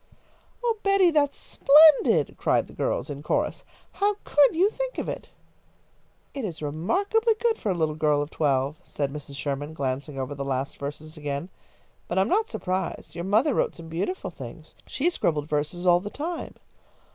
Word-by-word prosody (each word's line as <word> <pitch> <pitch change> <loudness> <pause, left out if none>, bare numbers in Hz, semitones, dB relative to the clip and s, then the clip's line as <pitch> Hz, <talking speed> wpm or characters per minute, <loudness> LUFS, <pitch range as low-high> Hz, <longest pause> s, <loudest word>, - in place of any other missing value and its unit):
"Oh, 460 -2 +1
Betty, 395 -3 +4
that's 290 -3 +2
splendid!" 275 - +5
cried - - +1
the - - -15
girls, 140 +5 -2
in 140 0 -6
chorus. 150 - -1 0.3
"How 410 +1 +1
could 290 +1 +4
you 365 +4 +4
think - - -4
of - - -3
it?" - - -5 1.0
"It 275 - -5
is 175 -7 -4
remarkably 380 - +1
good 460 -2 +1
for 210 - -2
a 185 - +1
little 160 -2 0
girl 150 -1 +2
of 145 +1 -3
twelve," 140 0 0
said 140 -1 -3
Mrs. 145 -1 -8
Sherman, 145 +2 -4
glancing 140 +1 -3
over 130 +2 -3
the 140 -1 -4
last 135 0 -3
verses 150 +3 -6
again. 145 +3 -4 0.6
"But 175 - -3
I - - +5
am 195 - +1
not 440 +4 +2
surprised. 185 - -3
Your 170 - -5
mother 220 +9 +3
wrote - - 0
some 165 -1 -10
beautiful 180 - -3
things. - - -10
She 285 - -1
scribbled 150 - 0
verses 150 +4 -2
all 175 -1 +6
the 205 +3 -6
time." 325 +8 -5
170 Hz, 180 wpm, -26 LUFS, -, 1.0 s, all